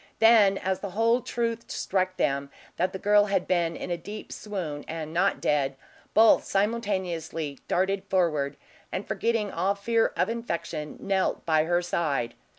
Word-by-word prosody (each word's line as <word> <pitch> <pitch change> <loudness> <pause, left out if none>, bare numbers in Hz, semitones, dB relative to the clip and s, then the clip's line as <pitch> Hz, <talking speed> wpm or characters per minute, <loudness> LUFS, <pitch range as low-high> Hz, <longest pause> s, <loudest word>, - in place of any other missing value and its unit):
Then, 220 -3 +6
as 190 0 -1
the 200 - -5
whole 230 +2 +3
truth 230 -1 -3
struck 185 -1 -1
them, 140 0 0 0.3
that 185 +1 +1
the 190 - -5
girl 205 +1 +4
had 195 -3 0
been 170 -2 +1
in 180 - -5
a 175 - 0
deep 205 +5 -8
swoon 170 -9 -5
and 160 -1 -5
not 190 +4 +2
dead, 140 -2 +1 0.4
both 220 0 +6
simultaneously 190 - -2
darted 190 +2 0
forward, 160 -8 0 0.3
and 185 - -4
forgetting 225 -3 0
all 190 +4 0
fear 225 +3 +1
of - - +2
infection, 170 -9 -4
knelt 195 -1 0
by 155 -1 +3
her 175 +1 +1
side. 145 -9 -1
185 Hz, 155 wpm, -27 LUFS, 165-210 Hz, 0.4 s, Then